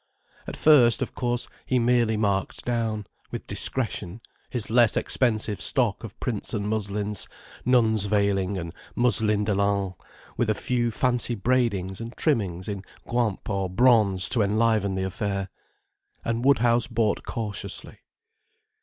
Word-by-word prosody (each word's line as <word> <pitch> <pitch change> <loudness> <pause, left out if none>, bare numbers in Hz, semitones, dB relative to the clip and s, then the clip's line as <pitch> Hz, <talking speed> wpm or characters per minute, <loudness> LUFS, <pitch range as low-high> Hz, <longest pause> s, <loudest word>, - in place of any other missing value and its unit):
At - - -6
first, 130 -7 +5
of - - -7
course, 120 -1 -2 0.2
he 130 - +2
merely 120 -2 +2
marked 100 -3 -1
down, 115 -3 -1 0.2
with - - -6
discretion, 110 -5 -3 0.3
his 115 -3 -3
less 120 -2 +4
expensive 110 -4 0
stock - - +1
of - - -9
prints - - -2
and 105 -1 -2
muslins, 105 -1 -1 0.4
nuns 110 -4 +3
veilings 100 -2 +1
and 85 -2 -5 0.2
muslin 110 -4 +2
delaines, 100 -2 +1 0.4
with 120 - +1
a 110 - +2
few 120 +2 0
fancy 120 +1 0
braidings 100 -5 0
and 115 +1 -7
trimmings 95 - 0
in 100 -2 -4 0.3
guimp 115 -5 -1
or 95 -2 -1
bronze 105 -3 +4
to 125 -4 +2
enliven 105 -1 +2
the 95 - -1
affair. 95 +1 -2 0.8
And 115 +1 -1
Woodhouse 120 -3 +3
bought 115 -4 0
cautiously. 110 -5 -5
110 Hz, 135 wpm, -25 LUFS, 100-120 Hz, 0.8 s, first